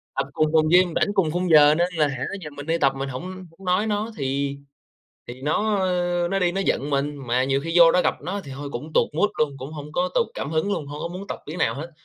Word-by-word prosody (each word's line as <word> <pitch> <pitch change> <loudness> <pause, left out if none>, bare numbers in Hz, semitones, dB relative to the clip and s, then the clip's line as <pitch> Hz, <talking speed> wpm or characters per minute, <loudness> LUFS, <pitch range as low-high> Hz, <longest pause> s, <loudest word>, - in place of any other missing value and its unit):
Tập 135 0 -1
cùng 155 - +2
phòng 155 -1 +4
gym, 175 0 +5
rảnh 205 - +1
cùng 190 -6 +2
khung 180 +2 -1
giờ 150 -1 +7
nên 175 +2 0
là, 155 -3 +2
hả, 130 -2 -4 0.2
giờ 150 - -6
mình 145 0 -9
đi 165 +1 +1
tập 140 -4 +3
mình 135 0 -4
hổng 130 +4 -6
hổng 185 -1 -10
nói 185 +4 +2
nó 215 +1 -1
thì 140 +1 -2 0.7
thì 125 +2 -9
nó, 205 +9 +1
ơ, 175 -2 0
nó 195 - +1
đi 180 -2 +2
nó 195 +2 -1
giận 140 - 0
mình. 145 +1 0
Mà 125 +2 +2
nhiều 135 +1 +1
khi 165 +1 -3
vô 170 -1 +8
đó 180 - +3
gặp - - +1
nó 185 +7 -4
thì 140 - -9
thôi 140 +1 -6
cũng 150 +6 -7
tụt - - +3
mood 205 +7 +2
luôn, 145 -2 +1
cũng 135 +2 -8
hông 150 -1 -8
có 270 - 0
tụt 485 -2 +3
cảm - - -4
hứng 160 +6 0
luôn, 150 - -4
hông 145 +1 -7
có - - -2
muốn 185 +3 -8
tập - - -5
miếng 155 +4 -6
nào - - +1
hết. 160 +5 -7
160 Hz, 280 wpm, -23 LUFS, 140-180 Hz, 0.7 s, vô